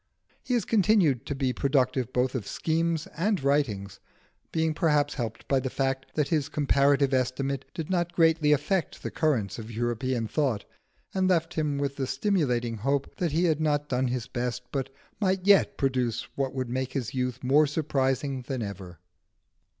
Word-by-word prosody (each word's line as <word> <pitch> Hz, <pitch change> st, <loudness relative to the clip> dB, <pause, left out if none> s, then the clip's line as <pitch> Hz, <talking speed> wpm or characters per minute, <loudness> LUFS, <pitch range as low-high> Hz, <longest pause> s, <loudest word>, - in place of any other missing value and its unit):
He 250 Hz, -, 0 dB
has 235 Hz, -, 0 dB
continued 185 Hz, -, +3 dB
to 140 Hz, -, -2 dB
be 135 Hz, -2 st, 0 dB
productive 130 Hz, -3 st, +1 dB
both 125 Hz, 0 st, +1 dB
of 120 Hz, -7 st, -4 dB
schemes 165 Hz, 0 st, 0 dB
and 185 Hz, 0 st, 0 dB
writings, 105 Hz, -9 st, 0 dB, 0.5 s
being 160 Hz, -1 st, +1 dB
perhaps 150 Hz, -2 st, +2 dB
helped 115 Hz, -4 st, -5 dB
by 135 Hz, -, +3 dB
the 130 Hz, 0 st, -3 dB
fact 135 Hz, 0 st, -2 dB
that 150 Hz, -2 st, +1 dB
his 150 Hz, -4 st, 0 dB
'Comparative 140 Hz, -1 st, +2 dB
Estimate' 130 Hz, +1 st, -1 dB
did 160 Hz, -2 st, -4 dB
not 175 Hz, -2 st, +1 dB
greatly 160 Hz, -2 st, +4 dB
affect 155 Hz, +5 st, 0 dB
the -, -, -3 dB
currents 125 Hz, -, 0 dB
of 110 Hz, 0 st, -8 dB
European 120 Hz, +1 st, -1 dB
thought, 130 Hz, -7 st, 0 dB, 0.5 s
and 190 Hz, -1 st, +2 dB
left 170 Hz, -2 st, +1 dB
him 150 Hz, -3 st, -1 dB
with 140 Hz, 0 st, -2 dB
the 135 Hz, -2 st, -1 dB
stimulating 125 Hz, -, 0 dB
hope 135 Hz, +5 st, -1 dB
that 175 Hz, -4 st, 0 dB
he 165 Hz, +4 st, +1 dB
had 160 Hz, -3 st, +2 dB
not 150 Hz, -1 st, 0 dB
done 130 Hz, 0 st, +1 dB
his 125 Hz, -1 st, -2 dB
best, 125 Hz, 0 st, -3 dB
but 135 Hz, -2 st, -2 dB, 0.3 s
might 190 Hz, -2 st, 0 dB
yet 200 Hz, 0 st, +5 dB
produce 130 Hz, -4 st, 0 dB
what 135 Hz, -1 st, -2 dB
would 130 Hz, -2 st, -3 dB
make 130 Hz, +1 st, -2 dB
his 125 Hz, -7 st, -3 dB
youth 125 Hz, -1 st, -2 dB
more 145 Hz, +4 st, +4 dB
surprising 140 Hz, -2 st, 0 dB
than 130 Hz, -4 st, -2 dB
ever. 95 Hz, -4 st, -7 dB
140 Hz, 175 wpm, -27 LUFS, 125-155 Hz, 0.5 s, yet